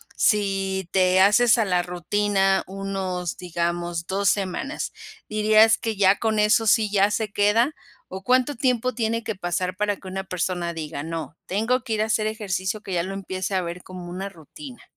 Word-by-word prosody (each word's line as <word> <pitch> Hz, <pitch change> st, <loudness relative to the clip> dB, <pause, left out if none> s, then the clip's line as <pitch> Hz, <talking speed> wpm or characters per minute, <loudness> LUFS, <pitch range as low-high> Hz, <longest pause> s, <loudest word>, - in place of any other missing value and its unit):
si 195 Hz, -3 st, +1 dB
te 185 Hz, -1 st, +3 dB
haces 215 Hz, +4 st, +5 dB
a 225 Hz, -, +2 dB
la 180 Hz, -2 st, +2 dB
rutina 195 Hz, +2 st, +1 dB
unos, 190 Hz, -2 st, -3 dB
digamos, 170 Hz, -1 st, -3 dB
2 195 Hz, +1 st, +1 dB
semanas, 200 Hz, -, -2 dB, 0.3 s
dirías 215 Hz, +1 st, +4 dB
que 225 Hz, -1 st, -2 dB
ya 195 Hz, 0 st, +4 dB
con 220 Hz, -1 st, 0 dB
eso 210 Hz, +1 st, +3 dB
sí 215 Hz, 0 st, +4 dB
ya 200 Hz, 0 st, +4 dB
se 210 Hz, 0 st, -2 dB
queda 225 Hz, +7 st, +3 dB, 0.4 s
o 190 Hz, +1 st, -7 dB
cuánto 255 Hz, +5 st, +2 dB
tiempo 250 Hz, 0 st, 0 dB
tiene 230 Hz, -1 st, -1 dB
que 220 Hz, -1 st, -3 dB
pasar 180 Hz, 0 st, -2 dB
para 205 Hz, +1 st, -1 dB
que 190 Hz, -, -13 dB
una 190 Hz, +1 st, -4 dB
persona 180 Hz, -1 st, -2 dB
diga: 155 Hz, -3 st, -5 dB
"No, 165 Hz, -1 st, -5 dB
tengo 225 Hz, +6 st, 0 dB
que 235 Hz, -4 st, -3 dB
ir 215 Hz, -, 0 dB
a -, -, 0 dB
hacer 215 Hz, -1 st, +1 dB
ejercicio", 210 Hz, -1 st, -3 dB
que 195 Hz, -, -6 dB
ya 170 Hz, -1 st, +1 dB
lo 190 Hz, +2 st, -5 dB
empiece 190 Hz, 0 st, -4 dB
a 185 Hz, -, +2 dB
ver 175 Hz, +1 st, -6 dB
como 185 Hz, -1 st, -9 dB
una 185 Hz, +3 st, -5 dB
rutina? 235 Hz, -, -12 dB
195 Hz, 185 wpm, -24 LUFS, 180-215 Hz, 0.4 s, haces